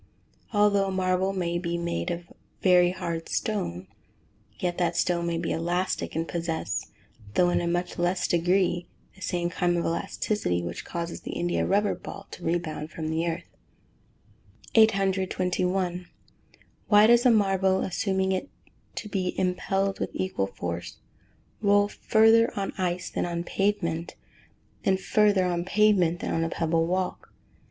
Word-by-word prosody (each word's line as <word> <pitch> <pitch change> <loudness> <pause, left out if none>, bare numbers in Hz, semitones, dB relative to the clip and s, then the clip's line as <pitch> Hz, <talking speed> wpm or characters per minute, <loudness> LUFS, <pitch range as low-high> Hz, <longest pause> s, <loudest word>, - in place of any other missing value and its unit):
Although 205 -2 +3
a - - -2
marble 185 0 +1
may 175 -3 -1
be 170 -1 -2
made 170 +1 -2
of 170 0 -5 0.3
very 180 -2 +6
hard 170 -2 -4
stone, 95 - -2 0.7
yet 175 -1 -2
that 170 -1 +1
stone 170 -1 +1
may 170 -1 -1
be 165 0 -2
elastic, 175 +3 -1
and 165 +1 -1
possess, 165 -1 -3 0.5
though 175 0 +4
in - - +1
a 170 - -2
much 175 +1 -2
less 175 +1 +1
degree, 175 0 +1 0.3
the 190 - -20
same 175 -1 -1
kind 175 0 +1
of 170 - -1
elasticity 165 - -1
which 85 0 -5
causes 170 0 -5
the - - -6
India 175 0 0
rubber 205 +2 +2
ball 200 - -9
to 180 - -10
rebound 160 -2 -2
from 160 -1 -4
the 165 +2 0
earth. 170 +1 -2 1.3
821. 185 -3 +1 0.8
_Why 210 +1 +8
does 240 +1 +6
a 250 - +6
marble, 195 -3 +3
assuming 190 0 0
it 190 +9 -2 0.5
to - - -5
be 190 -3 -2
impelled 195 +2 0
with - - -2
equal 185 - -1
force, 85 -2 -5 0.6
roll 205 -1 +4
further 225 +2 +4
on 195 - -3
ice 180 -1 -2
than - - -1
on 170 0 -3
pavement, 175 -4 -1 0.7
and 190 -1 +2
further 205 -1 +3
on 175 -1 0
pavement 185 -4 +3
than - - -2
on 165 - +1
a 165 - -1
pebble 165 0 0
walk? 185 +1 -2
180 Hz, 150 wpm, -27 LUFS, 170-195 Hz, 1.3 s, Why